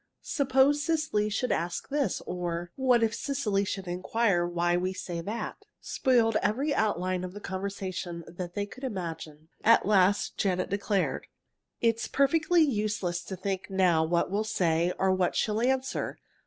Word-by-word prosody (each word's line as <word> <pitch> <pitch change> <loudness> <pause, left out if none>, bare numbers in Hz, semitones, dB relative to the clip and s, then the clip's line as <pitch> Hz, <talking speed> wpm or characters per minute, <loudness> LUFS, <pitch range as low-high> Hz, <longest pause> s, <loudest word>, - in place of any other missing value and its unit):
"Suppose 275 +1 +3
Cecily 305 -10 0
should 230 +4 -1
ask 170 +7 -2
this," 285 -1 0
or 175 -1 -4
"What 250 -3 +3
if 225 0 +1
Cecily 230 -8 -1
should 195 -1 -4
inquire 180 0 +1
why 175 0 +1
we 185 +1 0
say 175 -2 -5
that?" 215 +7 -5 0.2
spoiled 230 -4 +2
every 275 +7 +1
outline 185 -5 0
of 180 0 -6
the 205 - -7
conversation 190 -3 -4
that 175 0 -7
they 205 -1 -1
could 255 +6 -13
imagine. 165 - -5
At 230 +1 +5
last 200 -1 +3
Janet 185 -2 0
declared: 200 -1 -1 0.5
"It's 230 -1 +1
perfectly 320 +4 +3
useless 210 - -1
to 190 - -5
think 190 +1 -3
now 180 -4 +3
what 170 +2 0
we'll 205 +2 +1
say, 175 -5 +1
or 190 0 +2
what 185 -1 +1
she'll 215 +1 0
answer. 260 +1 -1
200 Hz, 155 wpm, -28 LUFS, 180-235 Hz, 0.5 s, At